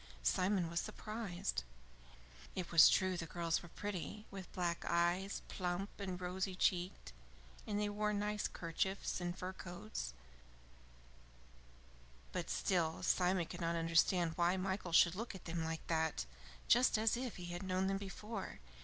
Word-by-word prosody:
Simon 180 Hz, -, +2 dB
was 170 Hz, +1 st, -1 dB
surprised. 205 Hz, -, -3 dB, 0.9 s
It 180 Hz, -2 st, -3 dB
was 165 Hz, -2 st, +10 dB
true 185 Hz, -1 st, +3 dB
the 165 Hz, -, -4 dB
girls 165 Hz, 0 st, 0 dB
were 175 Hz, -, -11 dB
pretty, 205 Hz, +3 st, -5 dB
with 190 Hz, -2 st, -8 dB
black 175 Hz, -2 st, -1 dB
eyes, 175 Hz, +3 st, +1 dB
plump, 180 Hz, +2 st, -2 dB
and 185 Hz, -3 st, -3 dB
rosy 185 Hz, +1 st, -2 dB
cheeked, 180 Hz, -, 0 dB, 0.5 s
and 205 Hz, -1 st, 0 dB
they 210 Hz, -, +1 dB
wore 210 Hz, +1 st, 0 dB
nice 210 Hz, 0 st, 0 dB
kerchiefs 185 Hz, +3 st, -2 dB
and 175 Hz, +1 st, -2 dB
fur 185 Hz, 0 st, -4 dB
coats, 180 Hz, -, -6 dB, 2.2 s
but 180 Hz, -2 st, -3 dB
still 170 Hz, -4 st, +1 dB
Simon 180 Hz, -1 st, +3 dB
could 175 Hz, +2 st, -7 dB
not 170 Hz, 0 st, +1 dB
understand 165 Hz, +1 st, +3 dB
why 175 Hz, +2 st, +3 dB
Michael 190 Hz, -1 st, -2 dB
should 170 Hz, +1 st, +7 dB
look 220 Hz, +2 st, -4 dB
at 190 Hz, -, -10 dB
them 165 Hz, 0 st, -2 dB
like 160 Hz, 0 st, -3 dB
that 160 Hz, -, 0 dB, 0.4 s
just 245 Hz, -1 st, +5 dB
as 220 Hz, +1 st, +3 dB
if 250 Hz, -1 st, -3 dB
he 180 Hz, -, -7 dB
had 175 Hz, -, -4 dB
known 185 Hz, 0 st, 0 dB
them 195 Hz, 0 st, +1 dB
before. 200 Hz, +1 st, -6 dB
185 Hz, 150 wpm, -37 LUFS, 170-200 Hz, 2.2 s, was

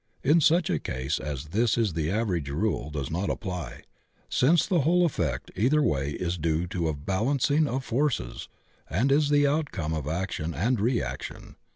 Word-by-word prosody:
In 160 Hz, +4 st, +4 dB
such 165 Hz, +3 st, +3 dB
a 80 Hz, -, +1 dB
case 65 Hz, +3 st, -2 dB
as 75 Hz, +1 st, -5 dB
this 110 Hz, +5 st, +2 dB
the 85 Hz, -9 st, 0 dB
average 95 Hz, -8 st, -1 dB
rule 75 Hz, -, -1 dB
does 75 Hz, -2 st, -4 dB
not 90 Hz, +5 st, -1 dB
apply, 90 Hz, -5 st, -5 dB, 0.5 s
since 155 Hz, +5 st, +3 dB
the 185 Hz, -4 st, +2 dB
whole 175 Hz, +5 st, +3 dB
effect 80 Hz, -, -2 dB
either 135 Hz, +9 st, +3 dB
way 70 Hz, -, 0 dB
is 90 Hz, 0 st, -3 dB
due 80 Hz, +1 st, 0 dB
to 85 Hz, -2 st, -1 dB
a 80 Hz, -, -1 dB
balancing 130 Hz, -, +1 dB
of 130 Hz, 0 st, -3 dB
forces 120 Hz, -, -1 dB, 0.4 s
and 115 Hz, +11 st, +1 dB
is 145 Hz, +1 st, +3 dB
the 145 Hz, 0 st, +4 dB
outcome 140 Hz, -, -1 dB
of 75 Hz, -3 st, -3 dB
action 85 Hz, -1 st, -3 dB
and 115 Hz, +7 st, +1 dB
reaction. 120 Hz, +4 st, -3 dB
95 Hz, 170 wpm, -27 LUFS, -, 0.5 s, In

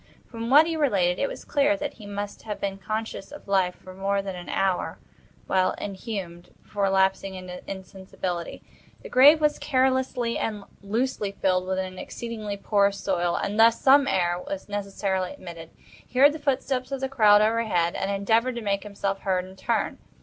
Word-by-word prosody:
From 230 Hz, 0 st, -6 dB
what 295 Hz, +4 st, +7 dB
he 330 Hz, 0 st, -2 dB
related, 195 Hz, -, +2 dB
it 275 Hz, -, +1 dB
was -, -, -8 dB
clear 295 Hz, +1 st, +2 dB
that 290 Hz, -1 st, -4 dB
he 210 Hz, -3 st, -12 dB
must 205 Hz, 0 st, -5 dB
have 210 Hz, -2 st, -6 dB
been 195 Hz, -1 st, -3 dB
conscious 215 Hz, +1 st, -4 dB
of 295 Hz, -, -11 dB
life 190 Hz, -2 st, +2 dB
for 185 Hz, -, -13 dB
more 195 Hz, +1 st, -1 dB
than 195 Hz, -1 st, -5 dB
an 175 Hz, -1 st, -8 dB
hour, 190 Hz, -2 st, 0 dB, 0.5 s
while 185 Hz, -1 st, +2 dB
inhumed, 190 Hz, -4 st, -6 dB
before 200 Hz, -1 st, -1 dB
lapsing 190 Hz, 0 st, +1 dB
into 180 Hz, -1 st, -8 dB
insensibility. 190 Hz, -2 st, -6 dB, 0.4 s
The -, -, -8 dB
grave 285 Hz, +5 st, +7 dB
was 300 Hz, -1 st, +1 dB
carelessly 260 Hz, -3 st, +1 dB
and 210 Hz, -2 st, -3 dB, 0.2 s
loosely 210 Hz, 0 st, -2 dB
filled 185 Hz, -2 st, 0 dB
with 190 Hz, 0 st, -1 dB
an 185 Hz, 0 st, -4 dB
exceedingly 215 Hz, -4 st, -5 dB
porous 200 Hz, -1 st, +2 dB
soil; 175 Hz, -3 st, 0 dB
and 205 Hz, +2 st, -2 dB
thus 230 Hz, 0 st, +6 dB
some 275 Hz, +1 st, +5 dB
air 175 Hz, -7 st, +1 dB
was 295 Hz, -1 st, -5 dB
necessarily 195 Hz, -1 st, -2 dB
admitted. 170 Hz, -, -10 dB, 0.4 s
He 250 Hz, -, -9 dB
heard 285 Hz, +3 st, +7 dB
the 310 Hz, -, -6 dB
footsteps 270 Hz, -2 st, -1 dB
of 275 Hz, -, -2 dB
the 265 Hz, -, 0 dB
crowd 215 Hz, -6 st, +5 dB
overhead, 215 Hz, -6 st, +1 dB
and 195 Hz, -, -2 dB
endeavored 225 Hz, +5 st, +1 dB
to 235 Hz, -, -4 dB
make 200 Hz, -1 st, 0 dB
himself 200 Hz, -1 st, -3 dB
heard 185 Hz, -2 st, -1 dB
in 190 Hz, 0 st, -13 dB
turn. 225 Hz, +4 st, -1 dB
200 Hz, 180 wpm, -25 LUFS, 190-245 Hz, 0.5 s, what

